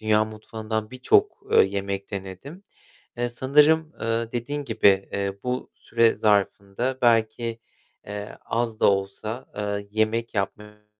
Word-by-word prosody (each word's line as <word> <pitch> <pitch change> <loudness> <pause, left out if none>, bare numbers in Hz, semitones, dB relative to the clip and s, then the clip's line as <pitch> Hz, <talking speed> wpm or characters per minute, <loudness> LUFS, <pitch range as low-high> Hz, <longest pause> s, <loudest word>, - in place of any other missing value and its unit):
dünya 110 0 +3
mutfağından 110 0 -5
birçok, 130 0 +2
eee, - - +8
yemek 100 0 -3
denedim. 100 - -7 0.6
Eee, 120 0 0
sanırım, 150 +6 +3
eee, 115 0 -1
dediğin 140 +5 -3
gibi, 100 -6 +3
eee, 100 0 -2
bu 125 0 -3
süre 115 -1 +2
zarfında 105 +4 0
belki, 115 0 +2 0.5
eee, 105 0 -6
az 115 -1 -2
da - - +6
olsa, 100 +5 -4
eee, 105 -1 -3
yemek 110 +2 0
yapmaya 105 +1 -4
110 Hz, 125 wpm, -25 LUFS, 100-120 Hz, 0.6 s, eee